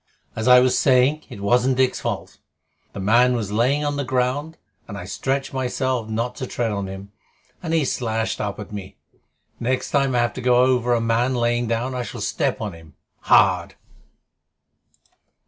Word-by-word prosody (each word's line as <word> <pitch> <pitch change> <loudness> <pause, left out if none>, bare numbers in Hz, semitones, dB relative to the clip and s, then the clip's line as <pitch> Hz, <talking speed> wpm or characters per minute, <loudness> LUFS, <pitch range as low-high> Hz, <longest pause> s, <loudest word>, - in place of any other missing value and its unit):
As 110 +2 -3
I 125 0 +8
was 125 0 +3
saying, 135 +3 +3
it 100 - -9
wasn't 125 +5 +2
Dick's 130 -1 +2
fault. - - -5 0.5
The - - -7
man 120 +6 +4
was 105 -4 -3
lying 130 +7 +1
on 145 0 -1
the 140 - -1
ground, 130 +5 -1 0.3
and - - -7
I - - -7
stretched 135 +1 -2
myself 130 -2 -2
not 115 +3 -2
to 130 - -4
tread 120 -2 -2
on 100 -1 -3
him, 95 +1 -9 0.5
and 165 - -4
he 160 -3 +2
slashed 115 -3 -2
up 105 -1 -4
at 105 - -8
me. 100 -2 -8 0.6
Next 125 +2 -1
time 140 -3 +1
I - - +3
have 120 -2 +1
to 130 - -6
go 125 0 +3
over 125 -1 +3
a 115 - 0
man 115 +3 +1
lying 120 0 0
down 115 +3 -1
I 125 - -2
shall 120 - -7
step - - -1
on 105 -4 -4
him 80 -3 -15 0.2
hard." - - +3
125 Hz, 180 wpm, -22 LUFS, 110-130 Hz, 0.6 s, I